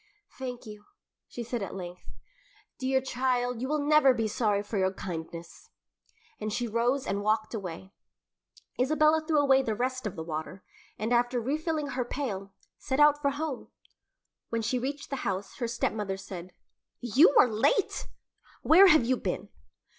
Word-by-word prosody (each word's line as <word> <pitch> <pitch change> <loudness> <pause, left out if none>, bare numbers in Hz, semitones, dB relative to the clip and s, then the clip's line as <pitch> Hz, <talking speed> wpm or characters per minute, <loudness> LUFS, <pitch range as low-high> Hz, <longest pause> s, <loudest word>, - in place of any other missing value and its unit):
"Thank 250 -2 -6
you," 210 -1 -11 0.4
she 240 - -6
said 235 0 -4
at 195 - -5
length. 180 -1 -8 0.7
"Dear 265 0 +1
child, 250 -2 -1
you 260 - -2
will 295 0 -1
never 295 -3 +5
be 225 -2 0
sorry 210 -2 0
for 205 0 -3
your 190 0 +2
kindness;" 170 -2 -8 0.7
and 215 0 -3
she 240 +3 -1
rose 240 +4 0
and 200 +1 -1
walked 215 +2 0
away. 190 -3 -6 0.9
Isabella 310 +4 +3
threw 310 -1 +1
away 275 -2 +5
the 225 -5 -2
rest 255 0 -2
of 195 - -6
the 160 - -5
water, 160 +3 -6 0.3
and 220 +4 -1
after 245 +1 +2
refilling 300 +4 -2
her 255 -2 -1
pail, 210 -7 -4 0.3
set 265 0 -2
out 295 0 +5
for 280 - +2
home. 285 -1 -4 0.8
When 230 -1 -2
she 250 +3 0
reached 280 +3 -5
the 275 - -2
house, 195 -4 -4
her 240 - -2
stepmother 210 -4 -2
said, 185 -2 -8 0.5
"You 260 - +5
are - - +7
late! 225 - +1 0.6
Where 375 +5 +8
have 310 -9 +5
you 255 +1 +2
been?" - - -4
240 Hz, 160 wpm, -28 LUFS, 205-275 Hz, 0.9 s, Where